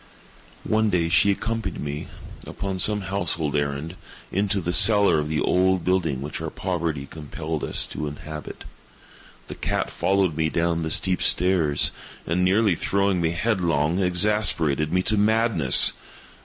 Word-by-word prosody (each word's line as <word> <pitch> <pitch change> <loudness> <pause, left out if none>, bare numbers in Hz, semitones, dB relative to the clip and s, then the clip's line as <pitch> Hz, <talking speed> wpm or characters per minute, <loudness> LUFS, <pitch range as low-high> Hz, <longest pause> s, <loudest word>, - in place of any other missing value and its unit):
One 110 0 +1
day 85 -4 0
she 85 +4 +4
accompanied 110 -1 -3
me, 75 0 -5 0.4
upon 95 -1 -5
some 105 +2 +1
household 90 -6 -3
errand, 70 +3 -3 0.4
into 100 +1 0
the 85 -1 -3
cellar 100 -7 +5
of 75 0 -3
the 80 - -1
old 95 0 +1
building 85 -8 0
which 75 - -6
our - - -4
poverty 85 -6 -3
compelled 80 +1 -6
us - - -1
to 75 - -6
inhabit. 75 +1 -9 0.8
The - - -7
cat - - -3
followed 95 -5 0
me 80 0 0
down 85 0 -1
the 80 - -3
steep 90 +1 +1
stairs, 85 -5 +2 0.3
and, 90 +3 -1
nearly 100 +2 +2
throwing 100 +1 0
me 80 - +1
headlong, 85 -5 0
exasperated 90 -5 +2
me 90 +1 +1
to 110 +2 +2
madness. 110 - +4
90 Hz, 145 wpm, -23 LUFS, 80-100 Hz, 0.8 s, cellar